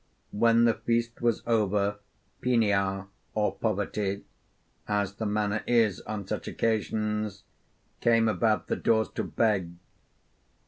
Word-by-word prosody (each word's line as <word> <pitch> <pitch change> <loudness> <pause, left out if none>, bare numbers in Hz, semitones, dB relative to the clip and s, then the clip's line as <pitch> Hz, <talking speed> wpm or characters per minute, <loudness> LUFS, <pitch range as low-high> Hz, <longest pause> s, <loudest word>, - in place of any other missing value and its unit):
When 115 +2 +4
the 115 -1 +5
feast 115 0 -1
was 120 -2 +1
over, 105 -3 +1 0.4
Penia 100 -5 +1 0.3
or 105 -1 +1
Poverty, 105 -2 -2 0.6
as 100 -1 0
the 110 +1 -3
manner 105 0 0
is 115 -5 +3
on 105 -3 -4
such - - -4
occasions, 105 -2 -1 0.6
came 115 -1 +4
about 110 0 +1
the - - -2
doors 110 -1 +2
to - - -3
beg. 100 -7 0
105 Hz, 120 wpm, -28 LUFS, 100-115 Hz, 0.6 s, the